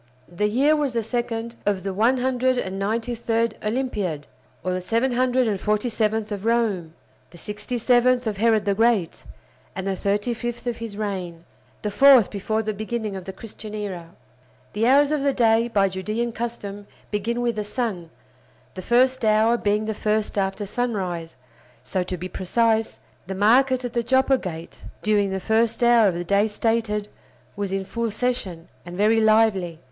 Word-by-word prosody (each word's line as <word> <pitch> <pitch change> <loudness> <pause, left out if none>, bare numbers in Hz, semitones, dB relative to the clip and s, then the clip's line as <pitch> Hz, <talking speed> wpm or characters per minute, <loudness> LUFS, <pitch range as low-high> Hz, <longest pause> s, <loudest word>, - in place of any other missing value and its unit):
The 180 +4 -1
year 275 +8 +3
was 290 -4 -1
the 230 -1 0
second 235 0 -3
of 200 -2 0
the 195 -1 -3
193d 230 -1 0
Olympiad, 210 - -2 0.4
or 185 - -1
the 185 - -1
747th 225 -1 0
of 200 -1 -4
Rome; 215 -8 0 0.3
the 175 - -15
sixty 210 +6 -5
seventh 245 +1 +3
of 215 -2 -2
Herod 220 -1 +2
the 200 - +2
Great, 220 -5 +1 0.5
and 190 -1 -4
the 195 -1 -1
thirty 205 +5 -1
fifth 240 +1 -5
of 240 -2 -2
his 225 -3 -7
reign; 185 -5 -4 0.4
the 210 - -2
fourth 260 -2 +6
before 215 +2 -2
the 215 0 -2
beginning 215 0 -4
of 190 -2 -7
the 190 - -5
Christian 215 +1 -9
era. 185 -5 -5 0.6
The 220 +3 +1
hours 285 +3 +5
of 300 -2 0
the 280 0 +2
day, 230 -1 +3
by 200 -4 +2
Judean 215 +6 -3
custom, 205 -3 -6 0.2
begin 225 +3 -1
with 240 -2 0
the 210 - -2
sun, 205 -6 -3 0.6
the 185 - -7
first 255 +4 +2
hour 220 +2 +4
being 210 -1 0
the 220 - -2
first 215 0 -1
after 195 +1 -1
sunrise; 190 -8 -3 0.5
so, 190 - -2
to 180 0 -4
be 180 +2 -5
precise; 220 +5 0 0.3
the 190 - -4
market 250 +5 +3
at 240 - -5
the 235 - +1
Joppa 260 +2 +3
Gate 165 -3 -7 0.2
during 210 -2 +2
the 190 0 -2
first 225 +4 +1
hour 235 -2 +6
of 185 - 0
the 175 - -3
day 200 +4 +2
stated 215 -1 -1 0.5
was 200 -2 -3
in 195 0 -2
full 230 +3 -2
session, 205 -7 -2 0.2
and 175 +1 -9
very 220 +2 +3
lively. 215 -6 +3
215 Hz, 165 wpm, -23 LUFS, 195-235 Hz, 0.6 s, fourth